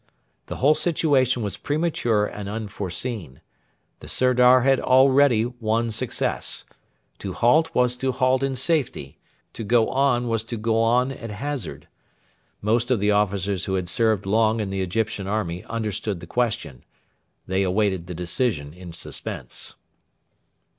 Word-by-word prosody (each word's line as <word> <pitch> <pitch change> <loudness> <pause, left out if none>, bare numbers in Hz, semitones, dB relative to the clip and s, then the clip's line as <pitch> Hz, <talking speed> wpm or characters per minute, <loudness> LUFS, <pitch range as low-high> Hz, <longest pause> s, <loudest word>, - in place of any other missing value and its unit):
The - - -5
whole 145 +4 +4
situation 140 -7 +1
was 100 - -3
premature 145 -9 0
and 105 -1 -6
unforeseen. 105 - -5 0.6
The - - -11
Sirdar 125 0 +4
had 135 +1 +3
already 130 -2 +4
won 115 -1 -1
success. 110 - -2 0.5
To 95 -2 -5
halt 155 - +3
was 125 0 +3
to 130 +1 0
halt 130 0 +2
in 135 -1 -1
safety; 130 - -1 0.3
to - - -6
go 115 +1 +3
on 130 -3 +2
was 115 -1 0
to 115 0 -5
go 115 +1 +1
on 125 +3 +2
at 115 -3 -7
hazard. 130 - -5 0.8
Most 115 +3 +1
of 125 -4 +2
the 105 +1 +2
officers 100 -2 0
who 95 - -1
had 90 -2 -2
served 110 0 +1
long 110 +2 +2
in 100 -3 -2
the 95 0 -2
Egyptian 100 +1 -2
army 95 -4 -2
understood 105 -3 -3
the 85 - -9
question. 85 - -2 0.6
They 95 +1 0
waited 95 -2 0
the 90 - -6
decision 85 - -2
in 90 -1 -10
suspense. - - -7
115 Hz, 145 wpm, -24 LUFS, 100-125 Hz, 0.8 s, whole